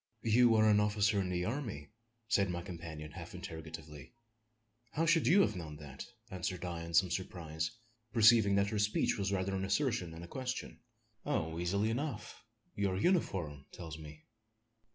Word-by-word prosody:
"You 115 +1 +5
are 110 0 +5
an 105 -1 +5
officer 105 -1 +2
in 95 - -2
the 90 -1 -1
army!" 110 - -4 0.4
said 100 -4 +3
my 85 -1 -3
companion, 80 -4 -7
half - - -9
interrogatively. 80 - -8 0.8
"How 165 - +1
should 165 0 +4
you 195 +5 +7
have - - +2
known 80 -4 -6
that?" 70 -3 -9 0.2
answered 90 -1 -3
I 85 -1 -4
in 85 0 -4
some 90 +1 +5
surprise 80 -3 -3 0.4
perceiving 110 -3 +6
that 100 +1 +2
her 105 - 0
speech 105 0 +1
was 100 0 0
rather 95 0 0
an 95 0 -1
assertion 100 - +1
than 80 +1 -9
a - - -8
question. 130 +4 -4 0.4
"Oh! 80 - -1
easily 100 +5 +1
enough; 140 +4 -4 0.3
your 100 -2 0
uniform 95 - 0
tells 80 -2 -8
me." 75 0 -11
95 Hz, 165 wpm, -34 LUFS, 80-110 Hz, 0.8 s, you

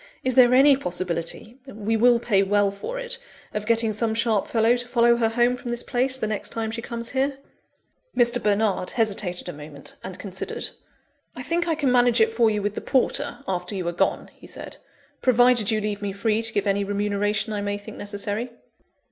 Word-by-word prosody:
Is 255 - 0
there 250 -1 +6
any 275 +2 +7
possibility 180 +2 -4
(we 220 -2 -2
will 240 +2 +5
pay 220 -4 +2
well 200 0 +2
for 200 - -6
it) - - -1 0.3
of 210 0 -4
getting 230 -1 +2
some 220 +1 +1
sharp 225 -3 +1
fellow 230 +1 +3
to 245 0 -3
follow 235 -1 +4
her 225 -2 +2
home 240 +2 +2
from 245 -1 -8
this 240 0 -2
place, 260 +1 0
the 240 - -2
next 215 -1 -3
time 225 -1 -3
she 230 +1 -4
comes 235 0 -4
here?" 270 +1 -1 0.8
Mr. 240 0 +4
Bernard 205 -3 +1
hesitated 200 -6 -1
a 175 - -5
moment, 150 -1 -11
and 185 -1 -7
considered. 195 -2 -5 0.6
"I - - -6
think 345 +1 -1
I 325 - +1
can 285 -4 +1
manage 245 -1 +4
it 220 0 +3
for 225 -1 +3
you 210 -1 -1
with 205 0 -1
the - - -5
porter, 280 +1 0
after 180 +1 -3
you 185 -3 -3
are - - -2
gone," 175 - -1
he - - -15
said, - - -9 0.4
"provided 245 -3 +4
you 220 - +1
leave 210 -1 -3
me 200 -1 -3
free 215 +2 0
to 225 -1 +2
give 205 -1 -1
any 200 0 +1
remuneration 205 +2 -1
I 205 - -2
may 205 0 -2
think 205 - -11
necessary." 205 +3 -2
220 Hz, 205 wpm, -24 LUFS, 205-245 Hz, 0.8 s, any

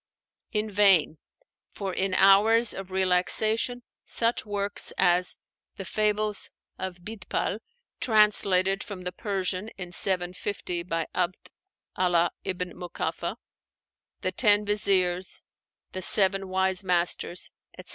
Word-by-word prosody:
In 215 0 -2
vain; 190 -7 +4 0.5
for 195 -2 -4
in 190 0 0
hours 215 +5 +5
of 190 -1 -8
relaxation, 190 +6 +1 0.2
such 230 -1 0
works 205 0 0
as 180 -1 +3 0.4
the 195 - -6
'Fables 210 0 -1 0.3
of 185 -2 -6
Bidpai' 210 -1 -3 0.4
(translated 200 -3 +2
from 200 -5 -8
the 180 - -4
Persian 190 0 -3
in 180 -2 -7
750 180 0 -1
by 165 -2 -3
'Abd 180 0 -3 0.4
Allah 175 -2 +2
ibn 180 -1 -4
Mukáffah), 180 -1 -4 0.9
the - - -1
'Ten 210 -3 +3
Viziers,' 190 -3 0 0.5
the 185 - -5
'Seven 195 0 +3
Wise 190 0 0
Masters,' 175 -1 -1 0.3
etc. - - -11
190 Hz, 110 wpm, -26 LUFS, 180-205 Hz, 0.9 s, hours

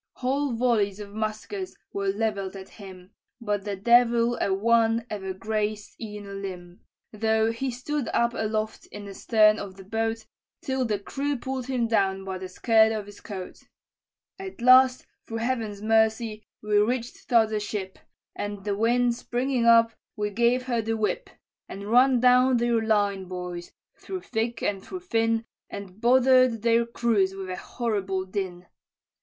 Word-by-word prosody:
"Whole 270 +1 -1
volleys 225 -4 +1
of 205 -1 -9
muskets 220 - -4 0.2
were 200 0 -2
levell'd 200 -1 -1
at 190 0 -9
him, 190 -2 -12 0.3
But 205 -3 -2
the 205 -1 -2
devil 235 +2 +4
a - - +1
one 225 +3 +2
ever 190 -2 -4
grazed 210 +1 -3
e'en 210 -2 -7
a 200 - -8
limb, 180 -3 -7 0.3
Though 220 +1 +1
he 260 +4 -3
stood 260 +3 -3
up 235 0 +1
aloft 215 -1 -3
in 205 0 -9
the 200 - -8
stern 215 0 +4
of 195 -2 -7
the 195 - -11
boat, 225 +2 -2 0.4
Till 265 -1 -1
the 215 -3 0
crew 280 +7 -3
pull'd 260 0 -4
him 250 -3 0
down 195 -3 +1
by 190 -1 -4
the 185 0 -7
skirt 220 +3 +4
of 215 -2 -3
his 205 0 -13
coat. 190 -4 -8 0.8
"At 385 -5 -8
last, 255 +1 +6 0.2
through 225 - -4
Heaven's 225 -4 -2
mercy, 220 0 +1 0.2
we 210 -1 +3
reached 235 +3 -2
t'other 220 -3 +3
ship, 200 -2 -5 0.4
And 205 -1 -5
the 205 -1 -1
wind 240 +3 +2
springing 245 +1 -1
up, 230 -1 +6 0.2
we 210 -2 -2
gave 240 +4 +2
her 240 -3 -1
the 225 +1 -2
whip, 220 - -2 0.4
And 200 +2 -7
run 250 +1 +5
down 250 +1 +5
their 235 -1 +1
line, 205 -3 +1
boys, 180 -1 -6 0.3
through 375 -1 -6
thick 230 -3 -3
and 195 -2 -1
through 370 -1 -7
thin, 225 -8 0 0.2
And 200 +1 -9
bother'd 255 -2 +4
their 235 0 +3
crews 220 -5 +1
with 190 -1 -6
a - - -3
horrible 195 -5 -2
din. 185 -2 -5
220 Hz, 160 wpm, -26 LUFS, 200-240 Hz, 0.8 s, last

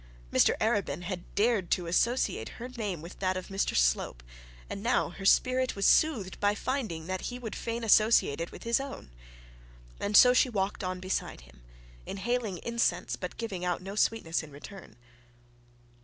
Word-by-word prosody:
Mr - - +4
Arabin 200 -8 0
had 180 -1 -5
dared 210 -4 +2
to 180 - +1
associate 235 +9 +1
her 245 - -6
name 210 -10 -4
with 170 - -10
that 185 -1 0
of 185 - -7
Mr 195 0 -1
Slope, - - +1 0.4
and 200 - -6
now 235 +4 +1
her 195 - -9
spirit 255 +5 +3
was 200 - -1
soothed 235 -12 +3
by 205 0 +2
finding 215 - -3
that 185 +1 -4
he 245 - -6
would 235 -3 -6
fain 230 0 -4
associate 215 -8 +4
it 170 - -4
with - - -11
his 235 +1 +2
own. 270 - -7 0.9
And 205 0 +3
so 250 0 +8
she 255 - +4
walked 200 -3 -2
on 185 0 -3
beside 185 - -3
him - - -19 0.5
inhaling 220 -1 -2
incense, 235 0 0
but - - -7
giving 200 -6 -4
out 180 -1 0
no 195 +1 -6
sweetness 205 -6 0
in 155 - -11
return. 150 - -12
200 Hz, 170 wpm, -29 LUFS, 180-235 Hz, 0.9 s, so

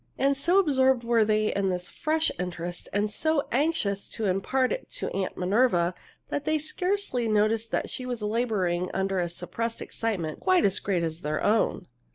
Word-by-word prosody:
And 275 +1 +2
so 340 +7 +2
absorbed 265 -8 +3
were 230 -1 +3
they 215 0 +1
in 195 -1 0
this 180 -1 -2
fresh 315 0 0
interest 175 -1 -5
and 205 +1 0
so 315 +3 +1
anxious 250 -8 0
to 225 - -3
impart 230 +7 +1
it - - -4
to - - -3
Aunt 190 -1 -3
Minerva 185 -2 +2 0.4
that 285 - -2
they 310 +1 +1
scarcely 315 - -1
noticed 215 +1 +1
she 255 - -5
was 240 -3 -3
laboring 210 -6 0
under 190 0 0
a 175 -1 0
suppressed 230 +7 -4
excitement 185 -9 -3
quite 370 -1 +3
as 195 - +2
great 185 -4 0
as 165 0 -3
their 150 +1 -2
own. 215 +2 +2
220 Hz, 175 wpm, -27 LUFS, 185-265 Hz, 0.4 s, absorbed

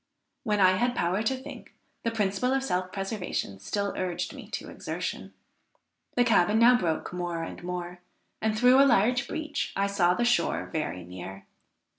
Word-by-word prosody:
When 210 -1 0
I 185 -1 +5
had 245 +2 +1
power 180 +4 +1
to 260 +4 0
think, 280 +2 -11 0.3
the 230 - 0
principle 220 +3 0
of 270 0 +1
self 185 -7 -1
preservation 195 - -3
still 200 - -2
urged 180 -2 -2
me - - -10
to - - -5
exertion. - - -5 0.8
The 245 - +4
cabin 210 -3 +3
now 240 +2 +7
broke 170 -6 -1
more 175 -2 -3
and 165 - -8
more, 180 0 -5 0.4
and 220 0 0
through 250 +3 +6
a 275 - +6
large 245 +7 +3
breach 310 -2 -3
I 200 - +1
saw 185 -3 +2
the 240 - +1
shore 240 -8 +1
very 150 - -2
near. 95 +2 -9
200 Hz, 170 wpm, -28 LUFS, 175-240 Hz, 0.8 s, now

